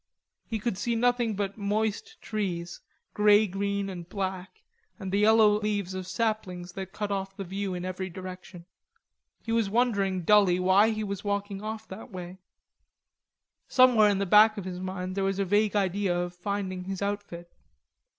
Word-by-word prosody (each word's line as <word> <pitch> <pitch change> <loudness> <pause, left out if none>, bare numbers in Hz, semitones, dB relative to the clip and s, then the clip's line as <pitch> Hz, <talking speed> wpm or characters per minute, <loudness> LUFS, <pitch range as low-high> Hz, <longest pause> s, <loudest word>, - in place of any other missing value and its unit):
He 225 - -2
could 210 -3 -3
see 235 +1 0
nothing 240 -2 +1
but 200 +1 -3
moist 220 - -2
trees, 175 -5 -3 0.3
grey 210 +1 +5
green 200 +1 -2
and 175 -3 -7
black, 190 - -5 0.3
and 190 -2 -6
the 200 - +1
yellow 210 0 +5
leaves 205 -3 -2
of 185 -1 -5
saplings 190 -3 -2
that 190 0 -7
cut 205 0 -4
off 195 0 -3
the 195 - -4
view 195 +1 -4
in 180 0 -5
every 185 0 -4
direction. 185 -1 -9 0.8
He 225 - -4
was 225 -3 +1
wondering 200 -5 +1
dully 195 -2 +5
why 190 +4 +5
he 215 -1 -2
was 200 -1 -4
walking 200 -1 -2
off 220 +1 -6
that 190 - -9
way. 185 -2 -8 1.3
Somewhere 245 -5 +5
in 200 - +1
the 200 - 0
back 215 +3 +6
of 200 - -5
his 180 -1 -5
mind 185 0 -4
there 195 0 -1
was 195 0 0
a 200 - 0
vague 205 +2 +2
idea 195 -2 +1
of 175 0 -3
finding 185 0 -4
his 195 +1 -4
outfit. 200 -4 -5
200 Hz, 170 wpm, -28 LUFS, 185-210 Hz, 1.3 s, back